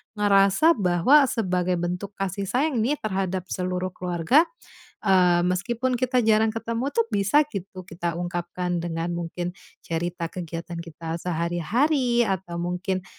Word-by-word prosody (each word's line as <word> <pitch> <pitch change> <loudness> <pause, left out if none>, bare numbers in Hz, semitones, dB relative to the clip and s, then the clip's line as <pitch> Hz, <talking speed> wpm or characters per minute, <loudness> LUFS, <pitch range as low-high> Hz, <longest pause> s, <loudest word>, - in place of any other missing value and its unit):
ngerasa 200 - +4
bahwa 195 - +5
sebagai 185 -6 0
bentuk 180 +3 -4
kasih 195 0 -3
sayang 265 +2 +1
nih 260 +7 +1
terhadap 190 -3 -1
seluruh 185 0 -2
keluarga, 180 - +2 0.6
eee, 180 -3 +4
meskipun 240 +8 0
kita 255 +1 +1
jarang 220 0 +4
ketemu 230 +4 -3
tuh 230 -4 +1
bisa 205 +10 +3
gitu 190 -6 -7
kita 170 -1 -4
ungkapkan 175 0 -3
dengan 170 0 -3
mungkin 175 +1 -4 0.3
cerita 170 +1 -3
kegiatan 170 -1 -6
kita 165 0 -6
sehari-hari 235 - +1
atau 190 -4 -3
mungkin 180 +2 -2
185 Hz, 125 wpm, -25 LUFS, 175-225 Hz, 0.6 s, bahwa